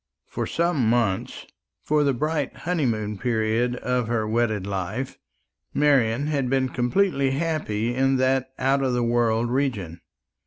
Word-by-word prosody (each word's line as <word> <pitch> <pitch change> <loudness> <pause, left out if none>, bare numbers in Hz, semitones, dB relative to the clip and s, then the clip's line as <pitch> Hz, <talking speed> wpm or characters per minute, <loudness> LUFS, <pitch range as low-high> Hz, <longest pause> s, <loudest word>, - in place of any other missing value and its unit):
For - - -4
some 165 -9 +1
months 115 -6 0 0.4
for 150 0 +2
the 140 - +3
bright 150 +1 -1
honeymoon 115 - -1
period 115 +1 0
of 125 -1 -1
her 115 -2 0
wedded 110 -3 0
life 100 +6 -4 0.6
Marian 135 -3 +3
had 140 -4 -1
been 130 0 +1
completely 135 +3 +1
happy 135 -8 -1
in 135 +1 +2
that 130 0 +1
out 135 +2 +2
of 130 -2 0
the 120 -1 +1
world 120 0 +1
region. 105 - -2
125 Hz, 140 wpm, -24 LUFS, 115-140 Hz, 0.6 s, the